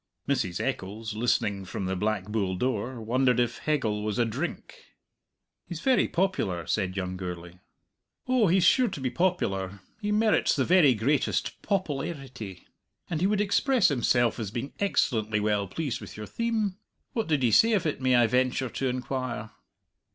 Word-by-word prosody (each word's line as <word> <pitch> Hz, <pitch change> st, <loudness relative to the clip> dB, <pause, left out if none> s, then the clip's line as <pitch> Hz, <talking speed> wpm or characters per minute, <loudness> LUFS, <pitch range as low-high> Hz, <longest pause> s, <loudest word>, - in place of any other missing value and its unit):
Mrs. 95 Hz, -11 st, 0 dB
Eccles, 105 Hz, +3 st, -3 dB
listening 105 Hz, -3 st, 0 dB
from 95 Hz, +1 st, -5 dB
the 95 Hz, 0 st, -1 dB
Black 105 Hz, +1 st, -1 dB
Bull 100 Hz, -3 st, -1 dB
door, 125 Hz, +2 st, -2 dB
wondered 125 Hz, +2 st, +2 dB
if 120 Hz, -1 st, 0 dB
Hegel 110 Hz, -9 st, 0 dB
was 105 Hz, -1 st, -2 dB
a 120 Hz, -, +3 dB
drink. 165 Hz, -, -6 dB, 0.7 s
"He's 175 Hz, -3 st, -6 dB
very 255 Hz, +3 st, +3 dB
popular," 170 Hz, -, -1 dB
said 95 Hz, -3 st, -1 dB
young 90 Hz, -1 st, -3 dB
Gourlay. 90 Hz, -1 st, -7 dB, 0.7 s
"Oh, 255 Hz, -5 st, +3 dB
he's 180 Hz, +1 st, +3 dB
sure 255 Hz, +7 st, +5 dB
to 185 Hz, -, -5 dB
be 130 Hz, -2 st, -2 dB
popular; 100 Hz, -, -1 dB, 0.2 s
he 210 Hz, 0 st, -1 dB
merits 215 Hz, +1 st, +3 dB
the 135 Hz, -4 st, +1 dB
very 165 Hz, -8 st, +5 dB
greatest 135 Hz, +7 st, 0 dB
popple 185 Hz, -9 st, -1 dB
arity. 130 Hz, -, -7 dB, 0.5 s
And 160 Hz, -1 st, -1 dB
he 185 Hz, -, +4 dB
would 205 Hz, 0 st, +1 dB
express 225 Hz, +3 st, +3 dB
himself 120 Hz, -3 st, +2 dB
as 110 Hz, -4 st, -3 dB
being 120 Hz, +5 st, -5 dB
excellently 110 Hz, -, +1 dB
well 105 Hz, -1 st, 0 dB
pleased 140 Hz, -, -3 dB
with -, -, -10 dB
your 105 Hz, -, -6 dB
theme? 220 Hz, -, -1 dB, 0.4 s
What 225 Hz, -2 st, -1 dB
did 150 Hz, -5 st, +1 dB
he 120 Hz, -, +3 dB
say 225 Hz, -, +5 dB
of 200 Hz, -6 st, +1 dB
it, 150 Hz, -4 st, -2 dB
may 130 Hz, -1 st, +3 dB
I 120 Hz, -1 st, +5 dB
venture 130 Hz, +1 st, +1 dB
to 135 Hz, -, -2 dB
inquire?" 125 Hz, -3 st, -3 dB
125 Hz, 170 wpm, -27 LUFS, 105-175 Hz, 0.7 s, sure